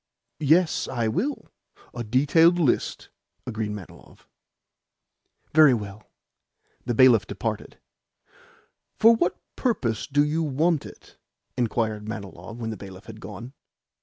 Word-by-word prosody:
"Yes, 160 +3 +2
I 120 -3 -1
will 230 - -2 0.4
a 120 - -4
detailed 145 +9 +4
list," 155 -8 0 0.4
agreed 110 -3 -3
Manilov. 105 -4 -11 1.3
"Very 150 -4 +7
well." 105 -1 -8 0.8
The 120 - 0
bailiff 120 -4 +6
departed. - - -4 1.2
"For 230 +1 +7
what 180 -5 0 0.2
purpose 125 - -1
do 145 +1 +3
you 155 +2 -1
want 155 +2 0
it?" - - -16 0.4
inquired 110 -3 -1
Manilov 110 +1 -8
when 115 -2 -4
the 110 - -6
bailiff 95 0 -11
had 110 -1 -11
gone. 115 +6 -9
120 Hz, 115 wpm, -25 LUFS, 110-155 Hz, 1.3 s, Very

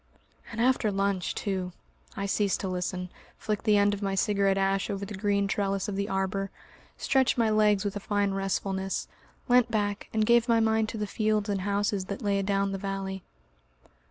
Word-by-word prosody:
..." - - -20
And 230 - -6
after 245 -3 +2
lunch 195 -2 -1
too! 185 -3 -3 0.4
I 200 - -2
ceased 200 0 +1
to 195 - -2
listen, 180 0 -3 0.3
flicked 210 0 -3
the 210 -2 +5
end 205 0 +4
of 205 - -5
my 195 -1 -1
cigarette 195 -1 +2
ash 195 0 +1
over 200 0 -3
the 210 - -8
green 200 0 +1
trellis 195 -1 -1
of 205 - -3
the 200 +1 -2
arbour, 195 +1 -1 0.5
stretched 265 -2 +2
my 225 -2 +3
legs 210 -1 +3
with 205 - -2
a - - -2
fine 205 0 0
restfulness, 195 0 -2 0.4
leant 245 -1 +4
back, 205 -2 -1
and 220 -1 +1
gave 235 +1 +4
my 230 -1 +5
mind 220 0 +2
to - - -5
the 210 - -1
fields 215 0 0
and 200 -2 0
houses 200 0 0
that 200 +2 -6
lay 200 -1 +1
adown 195 0 0
the 195 - -3
valley. 195 -1 -4
200 Hz, 195 wpm, -28 LUFS, 195-215 Hz, 0.5 s, the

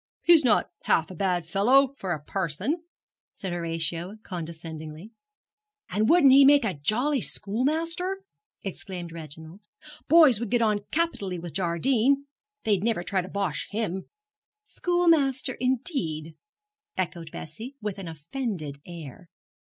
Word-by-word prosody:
'He's 335 -3 +7
not 230 -5 +3
half 160 +2 +2
a - - -8
bad 180 -2 0
fellow 250 +10 +4
for 190 -8 -4
a 155 - -1
parson,' 195 - -2 0.5
said 190 -3 -4
Horatio, 170 +2 -2
condescendingly. 160 +1 -7 0.8
'And 215 +2 +1
wouldn't 325 -6 +7
he 275 +1 +9
make 280 -2 +6
a 195 - 0
jolly 245 - +1
schoolmaster?' 330 - 0 0.4
exclaimed 175 -2 -6
Reginald. 160 +3 -9 0.5
'Boys 310 -9 +7
would 235 -2 -3
get 240 - +2
on 210 -2 +2
capitally 255 - -1
with 170 -2 -7
Jardine. 235 - +2 0.4
They'd 205 -3 +1
never 225 -6 0
try 190 +1 0
to 180 - -8
bosh 195 -6 -2
him.' 200 -4 -3 0.6
'Schoolmaster, 320 -10 +2
indeed?' 230 - -2 0.6
echoed 170 -3 -3
Bessie, 220 - -8
with 210 -2 -4
an 190 - -6
offended 160 - -5
air. 170 -1 -10
200 Hz, 130 wpm, -26 LUFS, 170-265 Hz, 0.8 s, he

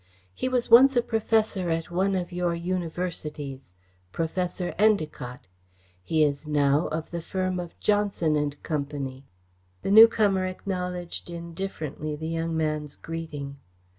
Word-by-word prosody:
He 255 - -2
was 250 -2 0
once 265 +3 +8
a 240 - +4
professor 220 -5 +1
at 165 +1 -2
one 190 +2 +1
of 180 -1 -2
your 175 -1 0
universities 165 - -4 0.4
Professor 175 - -2
Endacott. 155 - +1 0.6
He 155 - +2
is 145 +1 0
now 145 +1 +2
of 160 0 -4
the 170 -1 -3
firm 185 +1 -2
of 175 -1 -8
Johnson 205 -7 +1
and 145 -1 -1
Company." 140 -3 -4 0.6
The - - -1
newcomer 210 -3 +6
acknowledged 180 -2 -4
indifferently 170 -3 -5
the 160 +2 -5
young 165 0 -1
man's 155 -2 -1
greeting. 150 -4 -6
170 Hz, 130 wpm, -26 LUFS, 150-185 Hz, 0.6 s, once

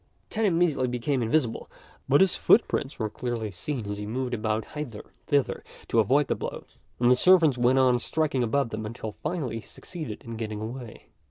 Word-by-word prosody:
Tan 225 0 0
immediately 165 -8 +2
became 125 +2 -1
invisible, 115 0 0 0.4
but 145 - +5
his 190 -2 +4
footprints 150 - +2
were 110 - -1
clearly 115 -1 -4
seen 115 +6 -4
as 100 0 -4
he 105 - -5
moved 125 +3 -2
about 110 -1 -2
hither 135 -8 -5
and - - -25 0.2
thither 145 -3 +1 0.3
to 115 - +3
avoid 135 +7 +4
the - - 0
blows, - - -7 0.2
and 120 0 +4
the - - +7
servants 165 -1 +5
went 125 +1 +3
on 125 -2 +4
striking 150 0 0
above 120 +2 +1
them 110 0 -4
until 110 -1 -6
finally 150 -9 -2
he - - -10
succeeded 155 - -8
in 115 -1 -7
getting 110 -2 -4
away. 115 +1 -8
125 Hz, 190 wpm, -27 LUFS, 110-145 Hz, 0.4 s, the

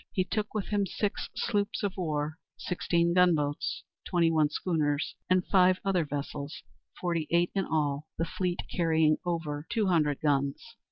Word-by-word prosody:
He 185 - +2
took 210 +3 -3
with 210 - -2
him 205 -2 +1
six 205 +3 -2
sloops 205 -3 -1
of 200 -2 -1
war, 155 -3 -2 0.2
sixteen 170 -1 0
gunboats, 160 -5 +2 0.2
twenty 170 -3 +2
one 155 -2 +3
schooners, 150 -2 0 0.2
and 185 0 +3
five 185 -1 +4
other 185 -4 +2
vessels, 145 0 -5 0.4
forty 170 -3 -1
eight 170 +1 +2
in 195 -2 0
all, 150 -1 -1
the 165 - 0
fleet 180 +1 -2
carrying 160 -3 +3
over 160 -3 -2
two 225 -3 +1
hundred 150 -5 +2
guns. 140 +9 0
170 Hz, 155 wpm, -29 LUFS, 150-185 Hz, 0.4 s, five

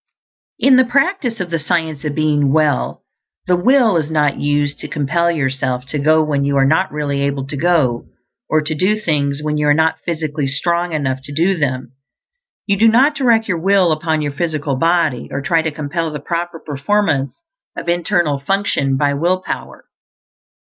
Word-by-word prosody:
In 265 -1 +5
the 260 - +6
practice 275 - 0
of 180 -2 -4
the 165 - 0
Science 160 -1 -2
of 145 -1 -3
Being 150 -3 +1
Well 155 -1 0 0.4
the 180 - +2
will 230 +1 +3
is 155 -2 -2
not 150 -3 +1
used 145 0 0
to - - -6
compel 155 +3 0
yourself 130 -5 -1
to 150 - -2
go 155 +2 +3
when 145 -2 -1
you 140 0 0
are 135 - +4
not 160 +7 +2
really 145 -2 -2
able 140 -1 -1
to 135 - -6
go, 140 -6 +1 0.4
or 155 - +2
to 155 +1 -2
do 190 +7 +1
things 145 -6 -1
when 150 0 -1
you 150 - +1
are 145 - +4
not 160 +1 +1
physically 155 -3 -3
strong 170 +5 -1
enough 135 -4 -1
to - - -9
do 175 +5 +2
them. 130 -6 -2 0.7
You 200 -1 +1
do 225 - +5
not 255 +7 +4
direct 235 -5 +2
your 180 -5 -1
will 190 -1 +3
upon 155 0 -1
your 145 - -2
physical 150 -2 -2
body 165 -4 +1
or 135 - -3
try 165 +4 +1
to 160 - -2
compel 160 +2 -3
the 150 - -5
proper 170 +3 -4
performance 145 -1 -1 0.4
of - - -6
internal 170 -4 0
function 140 -5 0
by 145 0 +1
will 175 +6 0
power. - - -6
155 Hz, 185 wpm, -17 LUFS, 145-175 Hz, 0.7 s, the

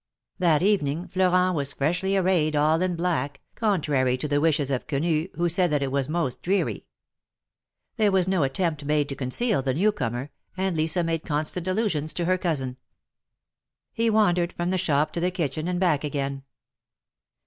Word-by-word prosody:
That 170 -3 +3
evening 175 -5 +1
Florent 185 -1 +2
was 140 -2 -2
freshly 180 +7 0
arrayed 175 -5 +2
all 155 +3 +3
in 185 -1 0
black, 160 -5 -1
contrary 145 - +1
to 140 - -3
the 145 0 +1
wishes 145 -3 +2
of 130 - -2
Quenu, 155 +3 0
who 175 0 +1
said 175 +1 +2
that 145 -1 +1
it 135 - -2
was 140 0 0
most 155 -6 -1
dreary. 195 +3 -1 1.1
There 215 -3 +3
w^as 190 -2 +2
no 190 -3 +1
attempt 150 +2 -1
made 150 0 +1
to 140 - -3
conceal 140 - 0
the 130 -1 -1
new 205 +7 +3
comer, 125 - -4 0.3
and 190 -1 0
Lisa 160 +3 0
made 165 -1 -1
constant 155 +4 -2
allusions 185 -7 0
to 175 - -1
her 185 +1 +1
cousin. 135 -8 -2 1.2
He 230 0 +1
wandered 180 -5 +2
from 175 +1 -2
the 185 - 0
shop 150 -4 +1
to - - -2
the 180 +2 +1
kitchen 155 -3 -2
and 180 -1 -1
back 165 -6 +2
again. 140 -2 -3
165 Hz, 175 wpm, -25 LUFS, 145-185 Hz, 1.2 s, That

